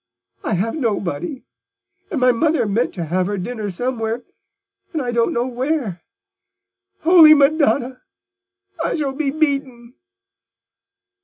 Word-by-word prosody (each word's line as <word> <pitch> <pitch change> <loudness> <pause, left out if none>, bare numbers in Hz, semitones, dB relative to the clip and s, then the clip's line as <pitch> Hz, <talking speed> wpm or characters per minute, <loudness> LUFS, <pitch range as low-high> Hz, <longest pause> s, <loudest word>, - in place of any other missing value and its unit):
I 215 - -1
have 210 +6 -1
nobody: 225 - -3 0.7
and 330 -10 -2
my 250 0 +5
mother 295 +1 +1
meant 220 +4 0
to 175 - -3
have 180 +3 0
her 205 0 -2
dinner 215 +2 -4
somewhere, 230 +3 -3 0.7
and 315 - -1
I 250 -3 -2
don't 235 -1 +1
know 240 +1 0
where. 255 - -2 1.0
Holy 320 -2 +8
Madonna! 280 -3 +2 0.8
I - - -1
shall 285 -4 -2
be 285 0 -1
beaten." 275 -5 -2
250 Hz, 125 wpm, -20 LUFS, 220-290 Hz, 1.0 s, Holy